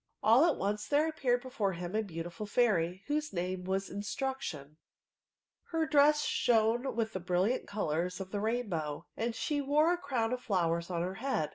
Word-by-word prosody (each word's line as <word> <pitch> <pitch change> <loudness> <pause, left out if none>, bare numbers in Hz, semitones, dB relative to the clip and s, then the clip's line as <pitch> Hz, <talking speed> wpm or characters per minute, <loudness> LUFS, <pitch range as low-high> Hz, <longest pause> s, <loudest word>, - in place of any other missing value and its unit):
All 230 +8 +6
at 335 - +3
once 205 +2 -2
there 300 +2 +3
appeared 250 -6 0
before 215 -7 -1
him 175 +3 -5
a 220 - +2
beaatifiil 175 +1 -6
fauy, 190 -6 +2
whose 300 0 -1
name 180 0 -3
was 195 +1 -1
Instruction* 205 - -4 0.9
Her 325 -1 0
dress 300 0 +4
Bhone 235 +2 +2
with 225 -1 -1
the 185 - -2
brilliant 180 +7 0
colours 180 -2 -2
of 190 -1 -6
the 205 - -2
rain 230 +3 -1
bow, 155 -3 -3
and 230 0 -2
she 295 -1 -1
wore 300 +5 +3
a 350 - -2
crown 250 -6 -1
of 250 - -3
flowers 170 -4 0
on 170 -2 -1
her 185 +1 -3
head. 250 - 0
215 Hz, 180 wpm, -32 LUFS, 180-265 Hz, 0.9 s, All